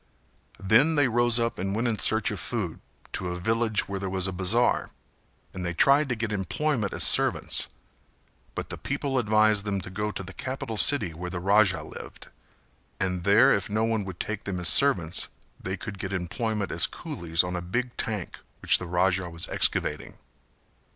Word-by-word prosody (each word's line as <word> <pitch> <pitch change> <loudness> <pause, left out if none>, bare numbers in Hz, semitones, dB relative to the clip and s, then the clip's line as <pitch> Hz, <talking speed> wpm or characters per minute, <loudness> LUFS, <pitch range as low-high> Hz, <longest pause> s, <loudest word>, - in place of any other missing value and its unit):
Then 115 +11 +3
they 145 -2 +3
rose 120 0 +3
up 115 -4 -2
and 95 +2 -2
went 115 +3 0
in 110 -3 -1
search - - +3
of - - -5
food - - -3 0.3
to 90 - -3
a 90 0 -4
village 110 +2 0
where 100 -1 -4
there 95 0 -4
was 95 0 -1
a - - -3
bazar, 95 +7 +1 0.6
and 95 - -6
they 85 -1 -3
tried 140 - +4
to 125 - 0
get 110 -1 -3
employment 105 - -1
as - - +1
servants; - - +3 0.9
but - - -5
the - - -6
people 135 -2 -2
advised 110 -2 +2
them 100 -1 -2
to 90 - -10
go 105 +2 -3
to 100 - -6
the 95 +1 -10
capital 130 -3 -5
city 105 - +4
where 90 +3 -6
the 90 -1 -5
Raja 100 0 +3
lived, - - -11 0.7
and 90 -2 -2
there 100 +2 +5
if 100 - -1
no 110 +2 0
one 110 -2 0
would 95 -2 -8
take 105 -1 -5
them 95 -3 -3
as 85 - +5
servants 90 - +4 0.3
they 95 +1 -4
could 100 -3 -8
get 95 -2 -4
employment 100 +4 -3
as - - +4
coolies 85 0 -1
on 90 0 -4
a 90 - -3
big 120 +8 -3
tank 105 -6 -4 0.2
which - - +3
the 90 - -7
Raja 90 +1 0
was 85 -1 -7
excavating. - - 0
100 Hz, 190 wpm, -26 LUFS, 90-115 Hz, 0.9 s, there